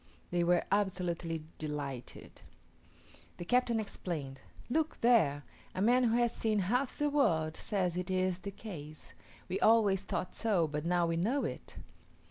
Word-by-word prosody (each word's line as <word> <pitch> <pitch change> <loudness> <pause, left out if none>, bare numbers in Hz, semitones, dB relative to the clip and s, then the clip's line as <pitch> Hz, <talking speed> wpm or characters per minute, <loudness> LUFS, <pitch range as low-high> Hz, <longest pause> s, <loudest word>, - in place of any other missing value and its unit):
They 175 -1 +2
were 175 0 +3
absolutely 180 -5 -1 0.2
delighted. 145 -5 -6 1.0
The 175 - -6
captain 240 +2 +2
exclaimed, 155 -10 -5 0.3
"Look 315 +5 0
there! 160 -13 +4 0.3
a 185 - -1
man 245 +3 +4
who 230 0 +2
has 240 -1 +2
seen 220 -1 0
half 245 +8 0
the 295 - +1
world 165 - +2
says 185 -5 -1
it 180 +1 -3
is 185 -1 0
the 200 - -6
case; 160 -7 -9 0.3
we 185 - -2
always 210 -4 +4
thought 185 - -3
so, 195 -8 +1
but 150 +1 -4
now 175 0 +2
we 165 0 0
know 235 +11 +1
it." - - -6
185 Hz, 150 wpm, -32 LUFS, 165-225 Hz, 1.0 s, there